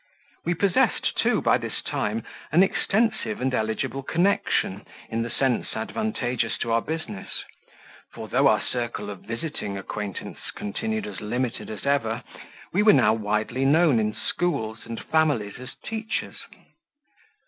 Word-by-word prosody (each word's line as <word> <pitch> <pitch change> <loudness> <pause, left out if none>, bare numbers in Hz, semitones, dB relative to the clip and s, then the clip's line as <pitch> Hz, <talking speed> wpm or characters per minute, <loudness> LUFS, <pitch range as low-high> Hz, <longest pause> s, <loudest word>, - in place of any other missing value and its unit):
We 175 +1 +1
possessed, 190 +1 +2
too, - - +2
by - - +4
this - - -4
time, 110 +2 -1 0.3
an 170 +5 +7
extensive 215 - +1
and 130 0 0
eligible 125 +4 -1
connection, 175 +8 +1 0.3
in 115 +1 -1
the 115 - -2
sense 130 0 0
advantageous 120 - -1
to 115 - 0
our 115 0 +4
business; 155 -12 -4 0.7
for, - - -7
though - - +4
our - - +4
circle 120 -4 -3
of 100 - -8
visiting 115 -5 -4
acquaintance 100 0 -5 0.2
continued 220 - -2
as 210 - -6
limited 120 +3 -2
as 110 +3 -6
ever, 120 -4 +1 0.5
we 190 - +4
were 210 0 +8
now 115 -6 +5
widely 110 +4 0
known 145 -2 +5
in 105 -1 0
schools 110 -11 -1
and 115 -1 -4
families 145 -10 +1
as 130 - -8
teachers. 220 0 -3
125 Hz, 140 wpm, -26 LUFS, 110-165 Hz, 0.7 s, were